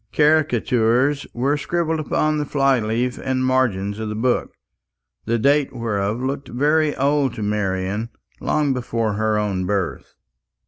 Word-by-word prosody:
Caricatures 135 -2 +2
were 135 +5 0
scribbled 160 +2 -1
upon 155 0 0
the 150 - -1
fly 135 -2 +2
leaves 115 +3 -1
and 130 -1 -1
margins 110 -6 0
of 110 -1 -3
the 105 - -4
books, 120 +3 -1 0.7
the 115 +1 +1
date 140 +3 +2
whereof 105 -2 -1
looked 135 0 -3
very 150 +4 +2
old 140 -1 +1
to 110 - -4
Marian, 105 +1 -1 0.3
long 150 -3 +1
before 115 -3 -1
her 110 +1 0
own 95 -3 -1
birth. 100 -4 -3
125 Hz, 140 wpm, -21 LUFS, 105-145 Hz, 0.7 s, Caricatures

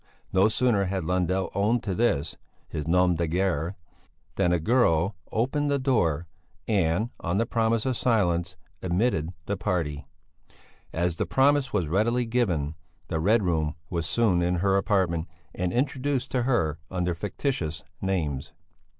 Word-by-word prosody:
No 95 +2 +5
sooner 110 -3 +2
had 95 -1 -2
Lundell 90 +2 0
owned 105 +5 +1
to 100 - -2
this, 100 -9 +1 0.3
his 75 0 -5
nom 90 +1 +4
de 85 0 -1
guerre, 90 0 0 0.6
than 90 -3 +2
a 90 - +2
girl 95 -3 +2 0.2
opened 140 +6 0
the 140 - +2
door 90 - +1 0.4
and, 100 +1 +1
on 85 +3 -1
the 115 - +2
promise 115 0 +1
of 130 -1 0
silence, 90 -7 +1 0.2
admitted 90 -3 0
the 100 - -1
party. 75 -8 -2 0.8
As 85 0 -1
the - - -1
promise 140 0 +3
was 100 -5 +1
readily 115 +8 +1
given, 90 -11 0 0.4
the 80 - -1
Red 105 +6 +3
Room 80 -3 0 0.2
was 85 -3 -1
soon 95 -1 +3
in 90 +1 +1
her 95 +2 +2
apartment, 95 -5 +1 0.3
and 90 0 -2
introduced 135 +2 -1
to 125 - +1
her 80 - +1
under 90 -1 -1
fictitious 85 - -3 0.2
names. 80 -8 -2
95 Hz, 150 wpm, -26 LUFS, 85-115 Hz, 0.8 s, No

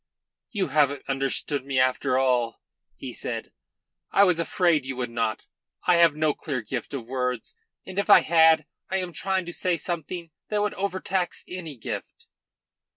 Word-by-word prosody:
"You 200 -4 -1
haven't 145 -2 +2
understood 135 +1 -1
me 135 -1 0
after 130 0 +2
all," 125 -3 +1 0.4
he - - -7
said. - - -5 0.6
"I 200 - +5
was 180 -4 +3
afraid 170 -3 +2
you 130 0 -5
would 125 -2 -3
not. 115 -3 -1 0.4
I 180 -1 +5
have 170 -3 +5
no 155 -1 +2
clear 130 -6 -4
gift 120 +4 -4
of 120 -4 -6
words, 125 -2 -2 0.3
and 190 +1 -4
if 200 - -1
I - - +9
had, 160 -1 +5 0.2
I 190 - 0
am 180 -2 -3
trying 190 0 -1
to 175 - -6
say 180 -1 0
something 170 +1 -4 0.2
that 210 -1 +1
would 210 - 0
overtax 190 -1 -2
any 165 -6 -7
gift." 110 - -6
155 Hz, 165 wpm, -26 LUFS, 130-180 Hz, 0.6 s, I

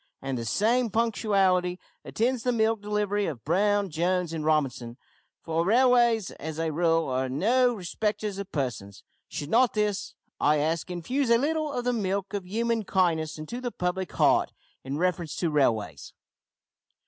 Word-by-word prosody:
And 135 -1 -4
the 115 -2 -4
same 230 - +1
punctuality 195 -5 +1 0.2
attends 245 +2 -1
the 250 - +1
milk 225 -2 +1
delivery 205 -1 -1
of 130 -8 -6
`Brown, 200 +4 +1
Jones, 175 +1 0
and 160 -2 -3
Robinson,' 135 -6 0 0.5
for 165 0 0
railways, 235 0 +3
as 155 0 -6
a 165 -1 -1
rule, 165 +1 +1
are 130 0 -1
no 240 - +2
respecters 210 +1 -3
of 200 - -7
persons. 115 -9 -4 0.2
Should 145 +1 -6
not 245 0 +4
this, 210 -2 -1 0.2
I 150 +1 +3
ask, 160 +4 -1
infuse 230 - -2
a 235 - +6
little 305 +3 -1
of 245 -3 -3
the 245 - +1
milk 200 -2 -2
of 195 -3 -4
human 230 +3 0
kindness 170 -6 0
into 195 +11 -6
the 250 - -2
public 180 -3 -3
heart - - +3 0.3
in 135 +2 -4
reference 175 -2 -1
to 170 -3 -1
railways? 120 -8 0
190 Hz, 160 wpm, -27 LUFS, 160-225 Hz, 0.5 s, a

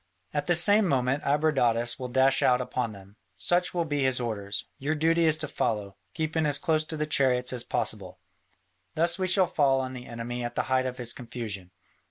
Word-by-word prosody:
At 145 -1 -2
the 175 - +3
same 205 +4 +6
moment 135 -1 0
Abradatas 135 -6 +1
will 130 - -4
dash 130 +2 +2
out 125 -1 +3
upon 125 -2 -3
them: 100 0 -14 0.2
such 175 - 0
will 170 -2 -1
be 145 -2 -2
his 130 -1 +2
orders; 105 -4 -4
your 145 +3 -1
duty 165 +2 +2
is 155 -1 +3
to 155 -1 -3
follow, 105 -8 -2 0.2
keeping 160 -1 -1
as 145 -1 +4
close 155 +1 0
to 160 - -5
the 150 - -1
chariots 130 -4 +1
as 120 -1 -1
possible. - - -1 0.8
Thus 170 +3 +1
we 185 - 0
shall 185 0 +4
fall 140 -5 +2
on 130 0 -4
the 125 -1 -9
enemy 120 +1 -5
at 120 0 -5
the - - 0
height 130 0 +2
of 125 -1 -6
his 120 -2 -1
confusion. 115 -7 -6
130 Hz, 205 wpm, -27 LUFS, 120-155 Hz, 0.8 s, same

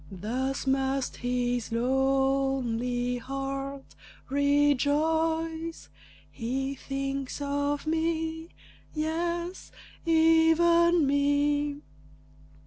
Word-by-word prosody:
Thus 250 +10 -3
must 270 0 0
his 245 -1 -1
lonely 255 -1 0
heart 275 +1 -5 0.4
rejoice, 320 +4 +1 0.4
"He 265 +3 -3
thinks 275 0 -4
of 285 +1 -1
me; 320 0 -1 0.5
yes, 340 +3 -3 0.3
even 330 +1 +4
me!" 285 +1 +1
280 Hz, 60 wpm, -28 LUFS, 265-320 Hz, 0.5 s, even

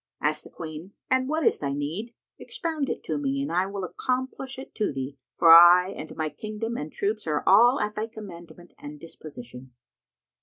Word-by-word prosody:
Asked - - -1
the - - -11
Queen, 160 +4 -9 0.2
"And 260 0 +2
what 315 0 0
is - - +3
thy 140 -1 -2
need? 165 +12 -4 0.2
Expound 315 -5 -3
it - - -4
to 155 -2 -2
me, 140 -1 -1
and 140 +3 -3
I 180 +2 +1
will 200 -1 -5
accomplish 260 +6 -3
it 265 - -10
to 215 - -1
thee, 135 +1 -6 0.2
for 165 - +6
I 175 +2 +8
and 155 - -8
my 155 -1 -2
kingdom 215 +8 -5
and 150 -4 -5
troops 210 -1 -2
are 150 -1 0
all 240 +7 +6
at 210 0 -1
thy 215 +1 -3
commandment 175 -6 -12
and 145 0 -9
disposition." 130 -5 -11
180 Hz, 190 wpm, -26 LUFS, 150-225 Hz, 0.2 s, I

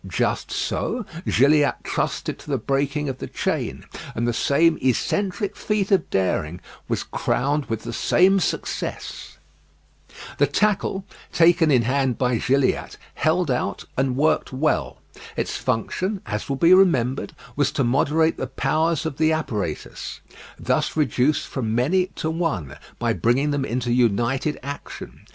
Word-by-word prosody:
Just - - -1
so 245 -4 -2 0.2
Gilliatt 145 +3 +4
trusted - - -2
to - - -12
the 140 - +1
breaking 140 +4 -1
of 130 -2 -4
the - - -5
chain; - - -2 0.3
and 120 +1 0
the 120 - +1
same 160 +7 +3
eccentric 195 - 0
feat 210 -1 -1
of 190 -4 +3
daring 90 -3 0 0.3
was - - -1
crowned 140 +3 -1
with 115 -1 -3
the 120 - -5
same 190 - +4
success. 175 - -4 1.0
The 145 - +5
tackle, 195 +4 0 0.3
taken 170 -2 +4
in 125 -5 +4
hand 130 0 +1
by 125 -3 +1
Gilliatt, 135 +2 +1 0.2
held 160 -1 +1
out 125 -5 -2
and 130 -1 0
worked 155 +3 +2
well. 145 +4 0 0.4
Its - - -2
function, 185 - -1
as 105 +5 -4
will 135 - 0
be 170 +6 +5
remembered, 135 -9 +3 0.2
was 145 -2 +1
to 140 - +1
moderate 150 +6 +2
the 130 - -3
powers 155 +5 0
of 150 -4 -3
the 160 0 +3
apparatus, 105 - -3 0.4
thus - - -1
reduced 145 0 +2
from 115 -5 -2
many 175 +10 +2
to 160 - -2
one, 160 - -2 0.2
by 115 -1 0
bringing 120 - +1
them 145 -2 0
into 120 -1 -1
united 120 +5 +1
action. 140 +1 -8
140 Hz, 145 wpm, -23 LUFS, 125-160 Hz, 1.0 s, The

